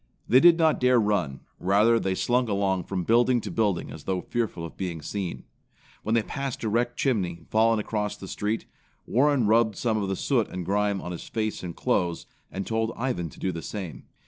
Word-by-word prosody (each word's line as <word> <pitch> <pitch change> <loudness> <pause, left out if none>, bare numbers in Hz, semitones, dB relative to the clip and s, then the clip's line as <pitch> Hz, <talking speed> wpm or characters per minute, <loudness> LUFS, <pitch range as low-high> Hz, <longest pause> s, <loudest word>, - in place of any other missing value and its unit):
They 125 - +6
did 170 +2 +7
not 160 -2 +3
dare 125 -1 +4
run. 100 - 0 0.2
Rather, 105 +5 +4
they 95 -3 -1
slunk 125 +3 +1
along 95 -3 0
from 95 -2 -2
building 120 +4 +4
to - - -6
building 105 -6 0
as 75 - -10
though 95 -1 -1
fearful 110 -8 -3
of 85 - -9
being 90 -4 -4
seen. 90 +4 -4 0.6
When 110 +2 0
they 115 - +3
passed 135 +1 -4
a 110 - 0
wrecked 120 +3 0
chimney, 95 -11 -1
fallen 110 +1 +4
across 105 -1 -2
the 95 - -9
street, 105 +4 -2 0.4
Warren 135 -1 +3
rubbed 110 0 +3
some 110 -1 0
of 100 - -2
the 95 - 0
soot 120 0 +1
and 90 -1 -5
grime 100 0 +1
on 90 - -6
his 85 - -7
face 110 -1 -2
and 90 -2 -6
clothes, 85 -1 0 0.3
and 95 0 -4
told 110 0 -1
Ivan 115 -10 -2
to - - -15
do 95 - -1
the 85 -1 -5
same. 90 - -6
105 Hz, 205 wpm, -26 LUFS, 95-115 Hz, 0.6 s, did